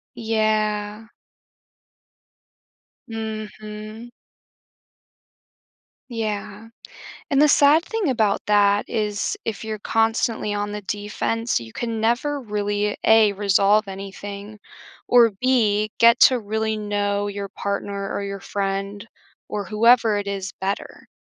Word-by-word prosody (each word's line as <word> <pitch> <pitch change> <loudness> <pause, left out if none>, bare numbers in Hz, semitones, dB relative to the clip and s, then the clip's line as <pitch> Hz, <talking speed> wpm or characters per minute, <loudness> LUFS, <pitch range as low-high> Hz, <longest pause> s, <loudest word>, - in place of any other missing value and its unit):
Yeah. 215 -1 -1 2.0
Mhm. 215 0 -7 2.0
Yeah, 215 -1 -4 0.6
and 275 - +3
the 300 - +6
sad 295 +4 +5
thing 445 -8 -1
about 220 -5 +1
that 205 -1 +3
is 210 - -2
if 225 -1 -4
you're 220 -1 -5
constantly 225 -1 0
on 205 0 -2
the 210 0 -5
defense, 210 - -2
you 115 -1 -10
can 230 - -4
never 265 +6 0
really, 205 -1 -2
A, 220 -2 +6
resolve 200 +1 +3
anything, 200 +2 -8 0.5
or, 240 -2 +6
B, 215 -2 +1
get 235 +1 +6
to 255 -2 +6
really 220 +1 -2
know 205 -1 -1
your 200 0 -5
partner, 200 0 -4
or - - -2
your 200 0 -5
friend, 195 +2 -3 0.4
or 205 -2 -4
whoever 225 0 +4
it 205 - -3
is, 195 -1 -4
better, 195 +1 -5
210 Hz, 110 wpm, -22 LUFS, 205-225 Hz, 2.0 s, the